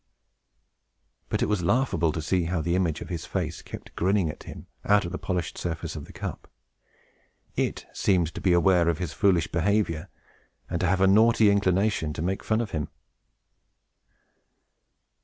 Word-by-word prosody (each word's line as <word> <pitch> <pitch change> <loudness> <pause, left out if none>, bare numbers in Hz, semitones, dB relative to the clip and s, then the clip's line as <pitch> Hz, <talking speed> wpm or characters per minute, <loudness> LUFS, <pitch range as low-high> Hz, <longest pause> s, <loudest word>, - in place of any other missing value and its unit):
But - - 0
it - - +3
was 105 -3 0
laughable 85 -5 +1
to 80 0 -4
see 90 +2 +1
how 85 +1 -1
the 85 +2 -1
image 85 -4 0
of - - -7
his 85 -4 -5
face 85 -5 -3
kept - - -10
grinning 95 -3 +1
at - - -14
him, - - -9 0.2
out 100 -2 +3
of 85 - -5
the 95 - -4
polished 90 -3 -3
surface 80 -2 -4
of - - -6
the - - -13
cup. - - -7 1.1
It - - -1
seemed 85 -4 +1
to - - -6
be 95 - +2
aware 85 -1 +4
of 85 - 0
his 90 -3 -4
foolish 90 -5 +2
behavior, 90 -1 0 0.6
and 85 - -3
to 90 - +2
have 95 +2 +1
a 95 - +6
naughty 110 +1 +5
inclination 100 -4 +1
to 75 - -4
make 95 +2 -2
fun 110 +1 +1
of 110 - -4
him. 75 -2 -2
90 Hz, 175 wpm, -26 LUFS, 85-100 Hz, 1.1 s, a